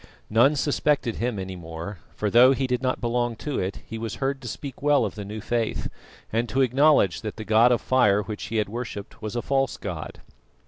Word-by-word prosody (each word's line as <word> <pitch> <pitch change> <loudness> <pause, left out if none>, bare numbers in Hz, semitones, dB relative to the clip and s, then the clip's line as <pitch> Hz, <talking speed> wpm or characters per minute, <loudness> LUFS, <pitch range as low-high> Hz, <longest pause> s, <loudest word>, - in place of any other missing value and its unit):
None 120 +7 +5
suspected 145 -4 +1
him 120 -2 -1
any 95 -1 -5
more, 85 +2 -7 0.2
for 105 -1 -1
though 125 +4 +7
he 135 0 -1
did 125 -1 -1
not 130 -1 0
belong 120 0 0
to 145 +5 -3
it, 95 +1 -3
he 115 - -6
was 110 -2 -4
heard 135 0 -2
to 125 - -8
speak 135 +3 -7
well 145 -4 +3
of 100 - -4
the 105 - -6
new 105 +2 -6
faith, 115 0 -1 0.4
and 115 +1 0
to 130 +5 +1
acknowledge 130 - +3
that 110 -2 -5
the 110 - -7
god 110 +4 +5
of 120 - +2
fire 105 -6 +3
which 105 +1 -6
he 110 +3 -5
had 105 -1 +1
worshipped 110 -2 -7
was 110 +1 -5
a 120 - -2
false 135 -1 0
god. - - -6
115 Hz, 220 wpm, -25 LUFS, 105-130 Hz, 0.4 s, though